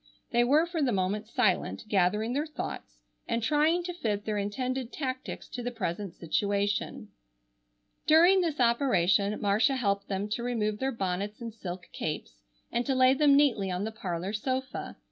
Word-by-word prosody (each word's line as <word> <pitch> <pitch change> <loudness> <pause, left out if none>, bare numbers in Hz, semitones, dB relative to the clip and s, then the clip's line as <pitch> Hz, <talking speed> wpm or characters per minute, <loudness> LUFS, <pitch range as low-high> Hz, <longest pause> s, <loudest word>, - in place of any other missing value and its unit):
They 240 0 +4
were 295 +7 +4
for 340 -2 -3
the 265 -3 +2
moment 200 +2 -1
silent, - - 0
gathering 210 +3 +1
their 295 +4 -1
thoughts, 300 - -7 0.2
and 230 -1 -1
trying 310 +6 +3
to 355 0 -4
fit 210 -11 -2
their 210 -1 -1
intended 250 +5 -2
tactics 260 -3 -5
to 245 - -5
the 245 - -2
present 200 -5 -4
situation. 200 +4 -1 1.0
During 345 +5 +6
this 320 -5 -1
operation 210 -5 +3
Marcia 215 +6 +2
helped 200 -5 0
them 195 +1 -2
to 220 +3 -2
remove 215 -3 -1
their 265 0 0
bonnets 200 -1 -3
and 230 -2 -6
silk 180 -4 -7
capes - - -5 0.3
and 240 - 0
to 270 - +1
lay 255 0 +6
them 280 0 +5
neatly 250 -9 +3
on 180 +1 -2
the 220 - -3
parlor 185 -2 -4
sofa. 260 +4 -3
225 Hz, 165 wpm, -29 LUFS, 200-265 Hz, 1.0 s, During